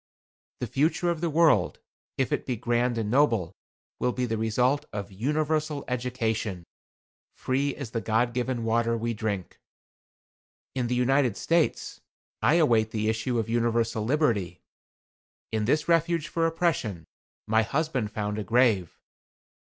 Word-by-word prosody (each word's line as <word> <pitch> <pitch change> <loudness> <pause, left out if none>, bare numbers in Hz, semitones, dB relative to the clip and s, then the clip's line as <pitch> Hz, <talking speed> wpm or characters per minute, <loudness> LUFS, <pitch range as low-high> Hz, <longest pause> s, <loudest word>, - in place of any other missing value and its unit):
The - - 0
future 165 +5 +1
of 165 -2 -4
the 170 - 0
world, 160 0 +3 0.4
if 130 - 0
it - - -1
be 125 - 0
grand 120 +1 0
and 110 -2 -2
noble, 115 - +2 0.5
will 125 - +1
be 125 0 -1
the 115 -2 -2
result 125 +6 +1
of 100 -1 -5
UNIVERSAL 150 +6 -1
EDUCATION, 115 -6 -2 0.7
FREE 140 +2 -1
AS 135 -6 -7
THE 115 - -2
GOD 115 +3 +1
GIVEN 125 -1 -2
WATER 115 +1 +1
WE 115 +1 -2
DRINK. 105 -4 -4 1.1
In 125 -2 -1
the 125 - 0
United 125 -2 +2
States 165 -1 0 0.4
I 155 - +4
await 115 -10 +3
the 110 -1 -1
issue 110 +3 -1
of 115 - -1
universal 115 -1 0
liberty. 110 - 0 0.9
In 110 -1 0
this 150 +6 +1
refuge 165 -1 +2
for 165 -1 +1
oppression, 150 - -1 0.4
my 110 +1 +3
husband 135 -1 -1
found 105 0 -3
a - - -2
grave. 110 -5 +2
120 Hz, 145 wpm, -27 LUFS, 110-145 Hz, 1.1 s, I